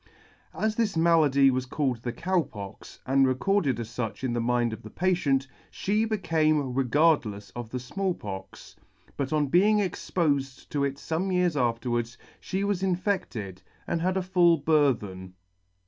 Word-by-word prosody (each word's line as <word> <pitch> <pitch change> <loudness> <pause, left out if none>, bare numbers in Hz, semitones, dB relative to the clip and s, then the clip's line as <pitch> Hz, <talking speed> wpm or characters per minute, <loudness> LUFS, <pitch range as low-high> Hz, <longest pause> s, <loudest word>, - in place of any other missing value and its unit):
As 215 0 0
this 220 -7 0
malady 150 -5 +4
was 130 0 -2
called 130 -2 -1
the 120 - -3
Cow 175 +8 0
Pox, 100 -8 -10
and 135 0 +4
recorded 135 - +1
as 115 -2 -5
fuch 115 0 -5
in 125 -2 -1
the 120 - 0
mind 120 -1 +1
of 110 - -8
the 110 - -10
patient, 150 -7 +1 0.2
fhe 215 +3 0
became 155 - +1
regardlefs 130 -6 +1
of 120 -2 -6
the 125 - -4
Small 185 +8 -2
Pox; 95 -2 -9 0.4
but, 140 -1 -3
on 150 -1 +2
being 190 +9 +4
expofed 150 -8 -1
to 145 -1 -1
it 140 -1 -1
fome 165 +6 -2
years 180 -3 +2
afterwards, 120 -2 -1 0.2
fhe 190 +1 -2
was 200 -2 0
infected, 180 - -2 0.2
and 165 - -2
had 185 +2 +1
a 190 - 0
full 175 -2 +4
burthen. 115 - 0
140 Hz, 160 wpm, -27 LUFS, 120-180 Hz, 0.4 s, malady